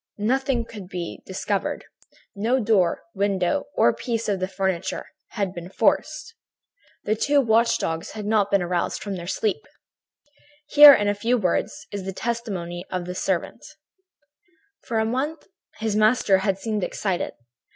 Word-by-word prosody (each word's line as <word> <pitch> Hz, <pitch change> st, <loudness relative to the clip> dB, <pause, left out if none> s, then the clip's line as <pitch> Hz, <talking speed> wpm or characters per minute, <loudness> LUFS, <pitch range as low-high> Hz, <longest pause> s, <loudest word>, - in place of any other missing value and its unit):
Nothing 250 Hz, +2 st, 0 dB
could 205 Hz, -5 st, -10 dB
be 175 Hz, -3 st, -6 dB
discovered. 195 Hz, +1 st, -2 dB, 0.5 s
No 230 Hz, +6 st, +1 dB
door, 205 Hz, -7 st, +2 dB
window 195 Hz, -3 st, 0 dB
or 120 Hz, -, +4 dB
piece 230 Hz, -2 st, -3 dB
of 195 Hz, -3 st, -1 dB
furniture 190 Hz, -2 st, -2 dB, 0.3 s
had 200 Hz, -5 st, -2 dB
been 175 Hz, -1 st, -8 dB
forced. 305 Hz, -, 0 dB, 0.7 s
The 215 Hz, -, +1 dB
two 285 Hz, +6 st, +2 dB
watch 230 Hz, -2 st, +3 dB
dogs 165 Hz, 0 st, -3 dB
had 215 Hz, -1 st, -6 dB
not 210 Hz, -2 st, +2 dB
been 200 Hz, -2 st, +2 dB
aroused 175 Hz, 0 st, -2 dB
from 200 Hz, -2 st, -4 dB
their 175 Hz, -1 st, -7 dB
sleep. 195 Hz, -4 st, -1 dB, 1.0 s
"Here, 295 Hz, -1 st, +10 dB
in 205 Hz, -, 0 dB
a 205 Hz, -, +2 dB
few 230 Hz, +5 st, +1 dB
words, 185 Hz, -6 st, -1 dB
is 200 Hz, -2 st, -5 dB
the 195 Hz, -, -4 dB
testimony 190 Hz, -7 st, -4 dB
of 180 Hz, -1 st, -3 dB
the 180 Hz, -, -5 dB
servant: 185 Hz, -1 st, -2 dB, 1.2 s
"For 230 Hz, -, -2 dB
a 220 Hz, -, +2 dB
month 275 Hz, +7 st, -2 dB, 0.3 s
his 220 Hz, -1 st, -2 dB
master 215 Hz, -2 st, +4 dB
had 190 Hz, -1 st, 0 dB
seemed 215 Hz, -1 st, -2 dB
excited. 190 Hz, -2 st, -2 dB
205 Hz, 150 wpm, -24 LUFS, 185-230 Hz, 1.2 s, Here